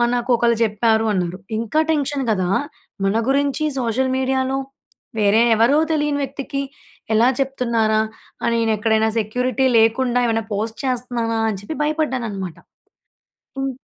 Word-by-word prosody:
"నాకు 245 +1 -3
ఒకళ్ళు 235 -1 +2
చెప్పారు" 220 +1 +2
అన్నారు. 180 -1 -2 0.2
ఇంకా 230 +7 0
టెన్షన్ 285 -2 -1
కదా! 185 -3 0 0.6
మన 195 +3 +2
గురించి 280 +2 +1 0.2
సోషల్ 255 +2 0
మీడియాలో, 265 0 0 0.6
వేరే 210 +2 +4
ఎవరో 235 +7 +4 0.2
తెలియని 295 -1 0
వ్యక్తికి 275 +1 -4 0.5
ఎలా 235 +3 +5
చెప్తున్నారా! 235 -5 +1 0.4
అని 235 0 +1
నేను 225 -1 +2
ఎక్కడైనా 220 +1 +2
సెక్యూరిటీ 250 +4 0
లేకుండా 245 +2 +3
ఏమైనా 225 -1 0
పోస్ట్ 220 +2 -3
చేస్తున్నానా? 240 -3 -1
అని 200 -3 -3
చెప్పి 255 +10 -6
భయపడ్డానన్నమాట. 250 - -2 1.0
హ్మ్. 270 0 -2
235 Hz, 125 wpm, -20 LUFS, 220-265 Hz, 1.0 s, ఎలా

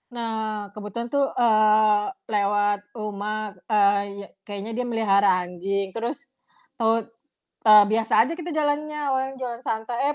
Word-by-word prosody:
Nah 220 -3 -4
kebetulan 210 +3 -6
tuh, 280 -1 +2
eee, 215 -2 +4 0.3
lewat 205 0 +1 0.2
rumah, 215 0 -4 0.2
eee, 200 -2 +3 0.2
ya - - -12 0.2
kayaknya 205 +2 -6
dia 250 - -1
melihara 200 -5 +2
anjing 190 +2 -3
terus 235 +5 -5 0.5
tahu 225 0 +2 0.6
eee, 210 -1 +9
biasa 220 0 +3
aja 285 +8 -3
kita 345 0 -5
jalannya, 300 0 -1
awalnya 265 0 -1
jalan 240 -1 -5
santai, 235 +5 -1
215 Hz, 130 wpm, -24 LUFS, 205-235 Hz, 0.6 s, eee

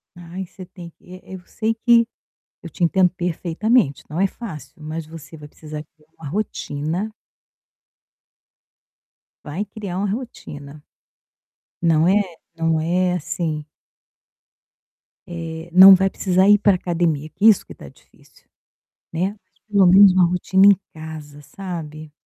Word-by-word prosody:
Ai, 175 +2 -8
você 185 +1 -12
tem 175 -2 -12
que 180 - -15
eh, 185 - -14
eu 185 - -7
sei 220 0 -2
que 235 0 +3 0.6
eu 170 - -8
te 175 - -8
entendo 185 +2 +3
perfeitamente, 180 - 0
não 165 +4 -3
é 195 - +4
fácil, 160 - -9
mas 155 +1 -6
você 160 0 -12
vai 150 -1 -12
precisar 150 0 -9
criar 150 0 -29
uma 155 -3 -8
rotina. 175 0 -3 2.3
Vai 165 +8 -4
criar 200 -3 -7
uma 200 +1 -1
rotina. 150 - -8 1.0
Não 165 -1 +3
é? 205 +2 +4 0.4
Não 165 -1 0
é 180 +2 0
assim 155 -2 -3 1.6
eh, 165 -1 -7
não 190 +2 +10
vai 190 +1 +1
precisar 190 +1 +1
ir 205 - +7
pra 205 -2 +3
academia, 165 -4 -2
que 205 - -3
isso 220 - +5
que - - -12
tá - - -13
difícil, - - -25 0.7
né? 185 +5 -2 0.3
Pelo 200 -2 +4
menos 190 +1 +7
uma 185 -1 +4
rotina 190 +2 +2
em 200 -2 +6
casa, 155 -2 -10
sabe? 155 -2 -8
175 Hz, 135 wpm, -21 LUFS, 155-195 Hz, 2.3 s, não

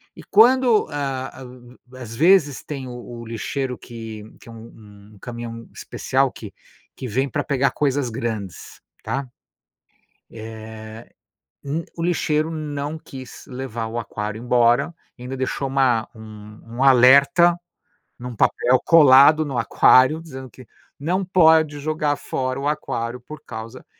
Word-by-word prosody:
E - - -11
quando, 240 +1 +5
ah, 135 -2 -3
u 125 0 -15 0.2
às 120 -3 -9
vezes 155 0 +3
tem 140 -3 -6
o - - -8 0.3
o - - -9
lixeiro 125 +3 -4
que 115 -3 -9 0.2
que - - -15
é - - -10
u - - -11
um 105 -2 -15
um - - -18
caminhão 115 0 -8
especial 135 0 -1
que 105 -5 -11 0.4
que 130 - -6
vem 130 +5 -1
pra 145 +2 -2
pegar 140 -1 +1
coisas 140 -3 -1
grandes, 110 - -6 0.2
tá. 135 0 -4 1.0
Eh, 110 0 -10 0.5
um 150 +4 -3
o 165 - -4
lixeiro 160 -2 0
não 150 -1 -4
quis 130 -5 -11
levar 125 -4 -5
o 115 +1 -6
aquário 105 -1 -5
embora, 120 +5 +2 0.2
ainda 125 +2 -7
deixou 130 +1 -2
uma 130 -4 +1
um 105 -1 -12 0.2
um - - +2
alerta 140 +6 +6 0.6
num 125 0 -8
papel 125 +4 +2
colado 155 0 +6
no 135 -4 -4
aquário, 130 +5 +4
dizendo 130 -5 -10
que: 130 +1 -15 0.3
"não 180 +7 -1
pode 160 -5 +4
jogar 150 0 -1
fora 130 -2 -4
o 140 - -2
aquário, 125 -4 -3
por 155 +5 -11
causa 115 +2 -9
130 Hz, 145 wpm, -21 LUFS, 115-145 Hz, 1.0 s, alerta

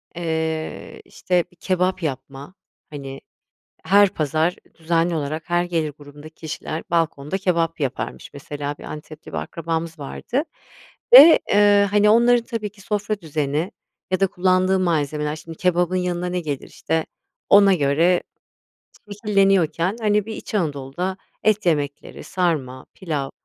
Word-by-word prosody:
eee, 160 -2 -3
işte, 180 -1 0
bir - - -23
kebap 185 0 -1
yapma, 135 +2 -5 0.4
hani, 135 -2 -8 0.6
her 200 +1 +5
pazar 160 -1 0 0.2
düzenli 165 +1 0
olarak 155 +2 -4
her 175 0 +2
gelir 165 -4 -2
grubundaki 145 +2 -13
kişiler 160 0 -6
balkonda 165 0 -1
kebap 170 -4 0
yaparmış. 135 -2 -4
Mesela, 145 0 -5
bir - - -12
Antep'te 155 0 -10
bir - - -5
akrabamız 165 0 -4
vardı 240 - -3 0.7
ve, 335 -10 +11 0.2
ııı, 205 0 +5
hani, 210 +1 +3
onların 235 +1 +4
tabii 225 -4 -4
ki 205 0 -21
sofra 210 +1 -2
düzeni 155 +1 -2 0.4
ya 185 - 0
da 195 - +4
kullandığı 185 +1 +2
malzemeler 150 -3 -1
şimdi 165 +1 -10
kebabın 180 0 +1
yanına 180 -1 -1
ne 180 0 -2
gelir 145 -5 -5
işte 160 -1 -2 0.4
ona 200 -1 +7
göre 165 +4 +2 1.0
şekilleniyorken, 195 -3 +2
hani, 210 -1 +1
bir 220 - -6
İç - - -9
Anadolu'da 160 +1 -2 0.3
et 215 -2 +2
yemekleri, 145 -4 -2
sarma, 150 -8 -2
pilav 150 -7 -3
170 Hz, 135 wpm, -22 LUFS, 150-190 Hz, 1.0 s, ve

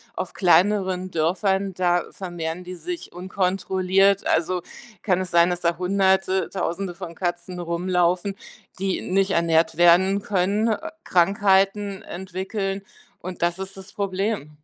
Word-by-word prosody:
auf 185 - -4
kleineren 185 0 +2
Dörfern, 190 +4 0
da 175 -1 +1
vermehren 175 -2 -5
die 180 0 -7
sich 350 - -6
unkontrolliert. 190 +1 +1
Also, 175 +2 +1 0.4
kann 185 -4 +1
es 185 -1 -4
sein, 170 +1 +5
dass 175 0 -2
da 170 0 +1
100e, 190 0 +2
1.000e 185 0 -2
von 170 -2 -8
Katzen 175 0 -3
rumlaufen, 180 +2 0 0.4
die 190 0 -1
nicht 195 +1 +1
ernährt 165 -2 +2
werden 185 +3 +5
können, 200 +3 +1
äh, 320 +9 -3
Krankheiten 195 +2 +2
entwickeln 195 +2 -4 0.4
und 185 0 -8
das 175 +1 +1
ist 190 0 -6
das 190 +1 -11
Problem. 195 -4 -2
185 Hz, 130 wpm, -23 LUFS, 175-195 Hz, 0.4 s, sein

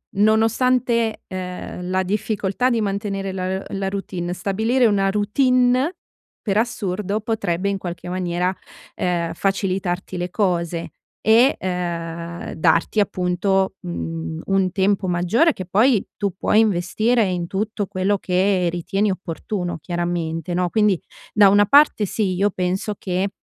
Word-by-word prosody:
nonostante, 225 +2 +2
ehm, 180 -1 -6
la 185 0 +1
difficoltà 210 +4 0
di 235 -3 +1
mantenere 195 -1 -2
la 190 0 -3
la 195 -1 -2
routine, 185 -3 -4
stabilire 220 +7 +1
una 200 -3 +3
routine, 250 - +2 0.5
per 200 -2 0
assurdo 210 -3 -1
potrebbe 200 -4 -1
in 200 - -1
qualche 175 -1 -6
maniera, 180 0 -1 0.4
ehm, 170 -2 -1
facilitarti 190 -2 -1
le 175 0 -3
cose; 170 -4 -1 0.3
e, 235 +5 +5
ehm, 170 -2 -4
darti 170 +6 +2
appunto, 190 0 +1
mhmm, 80 -1 -5
un 195 -1 +1
tempo 195 +1 +1
maggiore, 180 - +2
che 185 - -7
poi 215 +4 +3
tu 200 -1 -1
puoi 215 - +3
investire 215 +4 +2
in 180 -2 -2
tutto 205 +2 -2
quello 195 +1 0
che 185 0 +1
ritieni 195 +4 0
opportuno 180 0 -4
chiaramente, 175 0 -3
no. 180 0 0
Quindi 210 -3 +2 0.3
da 205 -2 +7
una 205 +1 +5
parte 280 -3 +5
sì, 195 -1 -1
io 200 +3 +2
penso 185 +3 -2
che, 185 +1 -1
195 Hz, 130 wpm, -21 LUFS, 180-210 Hz, 0.5 s, da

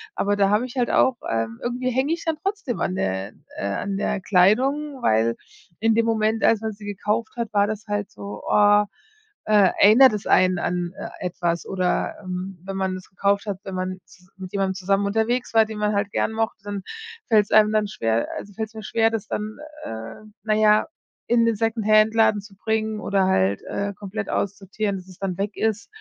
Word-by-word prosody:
aber 205 0 +1
da 195 -1 +3
habe 210 +4 +2
ich 255 +1 -9
halt 245 - +1
auch, 260 -2 +3
ähm 115 0 -2
irgendwie 250 +1 -1
hänge 265 +6 +1
ich 335 - -5
dann 320 -2 0
trotzdem 390 - -2
an 185 - -1
der 95 - -2 0.2
äh, 100 - -2
an 195 - -2
der 200 -1 -1
Kleidung, 260 +10 +2
weil 115 +1 +2 0.4
in 225 +1 +3
dem 230 0 +3
Moment, 220 0 +1
als 225 -1 +4
man 220 0 -2
sie 205 0 -12
gekauft 210 +2 -2
hat, 230 -2 -3
war 205 0 +3
das 215 0 -5
halt 205 -1 -2
so, 105 0 -8
oh, 205 0 +5 0.6
äh, 205 -3 +5
erinnert 225 +4 +8
das 210 - -4
einen 185 -1 +4
an, 175 0 -2
äh, - - -6 0.2
etwas 175 -1 -2
oder 185 -2 -1
ähm, 185 0 -5
wenn 195 - -5
man 190 -1 -1
das 185 - -10
gekauft 200 +2 0
hat, 195 -2 -3
wenn 195 - -7
man 185 0 -3
z 180 +1 -21
mit 185 0 -8
jemandem 195 -1 0
zusammen 195 +2 +1
unterwegs 230 +4 0
war, 220 -1 +6
den 215 -1 -7
man 210 0 +1
halt 200 0 -1
gern - - 0
mochte, 225 -2 -2
dann 205 -2 -5 0.4
fällt's 210 -3 +3
einem 215 0 +6
dann 215 -1 +2
schwer 115 - -1
also, 205 - -8
fällt 220 +2 -3
es 225 - -24
mir 220 - -7
schwer, 225 +1 +2
das 220 -2 -3
dann, 215 +1 -4 0.3
äh, 110 - -7 0.2
na 215 - +1
ja, 215 0 +4 0.4
in 235 -1 +3
den 230 -1 +2
Secondhandladen 220 0 +3
zu 200 -1 -16
bringen 220 +1 -1
oder 195 -2 +1
halt, 100 - +1
äh, 200 0 -3
komplett 200 +1 -6
aussortieren, 200 +1 -2
dass 185 0 -11
es 185 - -14
dann 190 -3 -3
weg 205 +1 -3
ist. 220 -1 -1
205 Hz, 205 wpm, -23 LUFS, 190-220 Hz, 0.6 s, erinnert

